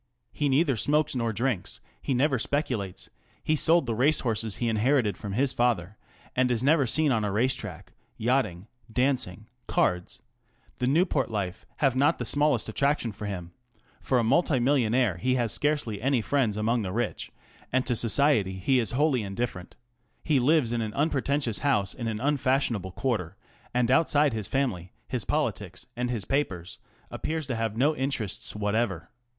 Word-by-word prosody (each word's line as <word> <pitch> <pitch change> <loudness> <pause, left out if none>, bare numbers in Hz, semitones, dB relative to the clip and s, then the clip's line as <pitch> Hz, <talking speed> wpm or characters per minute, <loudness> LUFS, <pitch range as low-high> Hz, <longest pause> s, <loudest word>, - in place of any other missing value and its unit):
He 145 -1 -1
neither 135 0 +3
smokes 150 +7 +2
nor 115 -3 -1
drinks; 115 -2 -2 0.2
he 135 - -1
never 135 0 +2
speculates; 120 - -2 0.3
he 155 - +2
sold 165 +1 +3
the 115 - -1
racehorses 115 -4 +1
he 120 - -2
inherited 110 -1 +2
from 100 +1 -6
his 130 +4 +2
father, 110 -6 0 0.4
and 130 0 +2
is 120 -1 0
never 140 -1 +4
seen 150 +5 +2
on 110 -4 +1
a 105 - -1
race 120 +6 +2
track; - - -8 0.2
yachting, 110 -7 0 0.3
dancing, 125 -6 0 0.2
cards, 90 +7 0 0.6
the 125 - 0
Newport 150 -1 +2
life, 100 -5 -4
have 135 -3 +2
not 140 +3 +3
the 125 - -4
smallest 145 -1 +1
attrac 140 +7 +1
tion 115 - -4
for 105 +1 -7
him; 90 -4 -5 0.5
for 130 - +1
a 120 - +2
multi 140 +3 +2
millionaire 120 - +2
he 130 +9 +1
has 120 -4 0
scarcely 145 -9 -1
any 135 0 +2
friends 115 -3 0
among 115 +2 +1
the 95 -3 -3
rich, 115 +2 -3 0.4
and 130 0 +1
to 125 - 0
"Society" 115 -4 +2
he 110 +8 +1
is 115 - -1
wholly 140 -2 +2
indifferent; 100 -2 -4 0.5
he 150 -4 +2
lives 130 -2 +3
in 120 - 0
an 110 -1 -4
unpretentious 140 -5 0
house 125 -9 +1
in 120 -3 -5
an 110 -1 -2
unfashionable 130 -8 0
quarter, 110 -11 -2 0.3
and 125 0 +1
outside 145 -1 +3
his 110 -4 -3
family, 110 -11 -2
his - - -3
politics, - - -2
and 125 0 -2
his 115 -6 -3
papers, 95 - -2 0.3
appears 160 -1 -3
to 130 -2 -3
have 115 -1 -2
no 145 +5 +3
interests 130 -10 -2
whatever. 105 -5 -1
120 Hz, 170 wpm, -27 LUFS, 105-140 Hz, 0.6 s, never